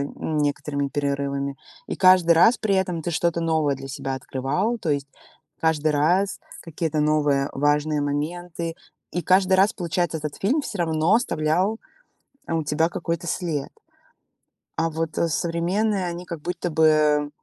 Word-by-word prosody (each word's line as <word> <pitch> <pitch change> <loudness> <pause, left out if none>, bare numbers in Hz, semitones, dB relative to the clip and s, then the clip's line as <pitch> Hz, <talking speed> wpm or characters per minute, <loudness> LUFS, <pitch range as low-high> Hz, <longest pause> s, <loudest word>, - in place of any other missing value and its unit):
некоторыми 145 -2 -1
перерывами, 140 -1 -2 0.3
и - - -3
каждый 185 -3 +5
раз 225 +8 +5
при 200 -3 0
этом 180 -3 0
ты 175 - -3
что-то 170 0 0
новое 160 -4 +1
для 135 0 -8
себя 135 0 -4
открывал, 145 - -2
то 165 - -4
есть 140 -1 0 0.5
каждый 155 -1 +1
раз 175 +7 +1 0.2
какие-то 160 -2 -3
новые 145 -2 +2
важные 145 +1 +1
моменты. 165 +3 -3 0.4
И 175 - -2
каждый 185 +2 +3
раз 195 +4 +4
получается, 175 -2 -1
этот 150 -1 -5
фильм 265 +10 +2
всё 205 -8 -6
равно 160 +2 +2
оставлял, 185 0 0 0.7
э, 165 - -2
у 160 -1 0
тебя 155 +3 +1
какой-то 170 0 -3
след. 155 -5 -2 1.1
А 165 0 +1
вот, 160 0 -4
э, 170 - +2
современные, 180 +5 0
они 175 +1 -5
как 170 -4 -7
будто 175 0 -3
бы, 150 -2 +3
160 Hz, 150 wpm, -24 LUFS, 150-175 Hz, 1.1 s, каждый